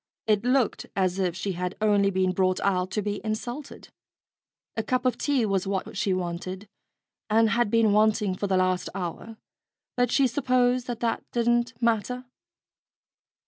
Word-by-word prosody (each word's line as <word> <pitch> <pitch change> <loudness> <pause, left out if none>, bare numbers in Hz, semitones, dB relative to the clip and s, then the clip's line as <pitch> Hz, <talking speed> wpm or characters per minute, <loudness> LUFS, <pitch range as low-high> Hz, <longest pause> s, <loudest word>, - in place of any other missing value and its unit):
It 210 -1 +2
looked 250 -1 +1
as 185 -1 0
if 180 -3 0
she 190 +2 -3
had 180 0 -3
only 205 -2 +3
been 185 -1 +1
brought 185 0 +1
out 185 -2 +1
to 210 +2 -2
be 205 0 -3
insulted. 240 +6 -5 0.9
A 225 - 0
cup 255 +3 -1
of 255 - +2
tea 275 -5 +1
was 195 -2 0
what 195 0 -3
she 200 0 0
wanted, 185 +2 -3 0.6
and 220 0 +4
had 235 -1 +2
been 225 -1 +3
wanting 210 -2 +3
for 200 +2 -3
the 190 -1 +2
last 185 0 +1
hour; 195 +5 -5 0.6
but 245 -1 +1
she 275 - +4
supposed 250 -1 +1
that 240 -2 -4
that 230 -1 -1
didn't 240 -1 +1
matter. 235 +2 0
215 Hz, 160 wpm, -26 LUFS, 190-240 Hz, 0.9 s, and